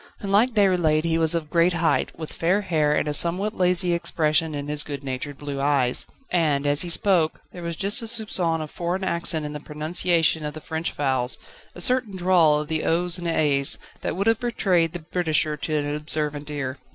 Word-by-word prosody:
Unlike 205 +5 +2
Déroulède 175 -7 +3
he 165 -1 0
was 160 0 +3
of 155 -2 -3
great 170 +1 +3
height, 165 -1 +1
with 160 -2 -7
fair 180 +5 +1
hair 155 -6 +1
and - - 0
a 150 - -1
somewhat 185 +8 0
lazy 180 -1 +2
expression 160 -2 0
in 145 0 -5
his 150 0 +1
good 145 -2 -5
natured 135 +1 -5
blue 145 -1 -5
eyes, 135 -3 +3 0.2
and 150 -5 +1
as 145 0 +4
he 175 - -2
spoke, 170 -3 +2
there 175 - -9
was 170 -1 -4
just 200 +9 -1
a - - -5
soupçon 200 -8 -1
of 155 - -7
foreign 180 +2 -3
accent 170 -4 0
in 150 - -5
the 150 - -5
pronunciation 160 +2 0
of 150 0 -5
the - - -6
French 160 +2 -3
vowels, 130 -3 -1 0.4
a 175 - -8
certain 250 -1 +1
drawl 175 -5 +4
of 150 +1 -6
o's 170 +3 +1
and 175 - -4
a's, 145 -4 +2 0.2
that - - -3
would 195 +2 -1
have 225 -1 +3
betrayed 180 -9 +1
the 175 - -4
Britisher 155 -3 +1
to 155 +1 -2
an 145 0 -2
observant 150 -1 -3
ear. 140 -2 -4
160 Hz, 200 wpm, -24 LUFS, 150-180 Hz, 0.4 s, as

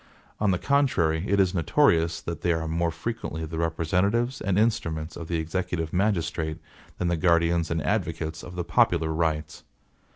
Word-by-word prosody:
On 105 - +2
the 90 - +2
contrary, 95 - +1
it 100 - +2
is 95 -2 +3
notorious, 85 - +2
that 85 -1 -5
they 85 - +2
are 80 0 -2
more 85 +1 0
frequently 85 -2 -4
the 80 +1 -5
representatives 90 - 0
and 100 -1 0
instruments 80 -8 0
of 85 - -7
the 85 - -1
executive 80 0 -2
magistrate, 85 -5 0 0.4
than 90 - -1
the 85 - +1
guardians 85 0 +2
and 80 -2 -1
advocates 80 +2 -2
of 90 - -10
the 90 - -2
popular 80 -2 +2
rights. 80 -1 -2
85 Hz, 165 wpm, -26 LUFS, 80-95 Hz, 0.4 s, is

